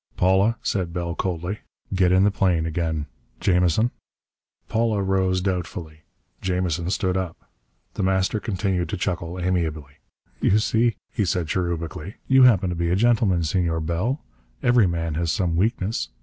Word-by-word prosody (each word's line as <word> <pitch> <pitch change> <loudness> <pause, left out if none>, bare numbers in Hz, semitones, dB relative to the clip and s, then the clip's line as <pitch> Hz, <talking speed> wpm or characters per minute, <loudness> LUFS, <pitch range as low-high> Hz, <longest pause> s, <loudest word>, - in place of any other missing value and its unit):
"Paula," 95 +5 +3
said 90 -6 -1
Bell 85 -1 -2
coldly, 90 +3 -3 0.3
"get 90 -1 +3
in 95 +1 +5
the 105 - +4
plane 90 -4 +1
again. 80 -2 -2 0.3
Jamison 90 +5 +2 0.4
" - - -53
Paula 115 -2 +1
rose 95 -1 +1
doubtfully. 85 -4 -4 0.4
Jamison 90 -2 -1
stood 95 -1 0
up. 95 -3 -2 0.6
The - - -3
Master 95 +2 +1
continued 95 -4 -1
to - - -2
chuckle 90 -1 -3
amiably. 80 -5 -2 0.4
"You 100 - +3
see," 115 +1 +2 0.2
he 105 - 0
said 90 -2 0
cherubically, 85 +1 -3
"you 135 0 +5
happen 100 -8 +5
to - - -2
be 85 0 -1
a 90 - +2
gentleman, 110 -5 +3
Senor 80 0 0
Bell. 85 - -1 0.4
Every 120 -5 +5
man 85 -2 -2
has 85 +1 0
some 85 -3 0
weakness. 105 +2 0
90 Hz, 150 wpm, -24 LUFS, 85-100 Hz, 0.6 s, in